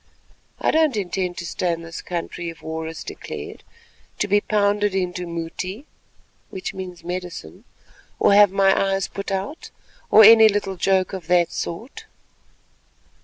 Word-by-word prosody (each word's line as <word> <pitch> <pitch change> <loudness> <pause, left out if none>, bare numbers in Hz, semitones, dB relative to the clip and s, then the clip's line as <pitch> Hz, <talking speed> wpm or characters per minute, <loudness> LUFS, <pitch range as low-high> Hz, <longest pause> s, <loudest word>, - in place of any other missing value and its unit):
I - - +1
don't 310 -6 +2
intend 185 -2 -2
to 170 - -5
stay 175 +1 -1
in 165 0 -4
this 165 0 -8
country 175 0 -5
if 165 - -12
war 160 0 -4
is 160 0 -7
declared, - - -8 0.5
to 210 - 0
be 205 +1 +3
pounded 205 -1 +1
into 180 -1 -2
mouti 170 - -5 1.2
(medicine), 175 - -7 0.5
or - - +4
have 205 0 +7
my 195 0 +2
eyes 195 - -2
put 200 0 -6
out, 195 - -4 0.4
or 220 - +8
any 220 +1 +9
little 200 -2 -2
joke 190 +1 +1
of 185 -4 -6
that 175 -1 +3
sort." 220 +11 -6
190 Hz, 140 wpm, -22 LUFS, 175-205 Hz, 1.2 s, any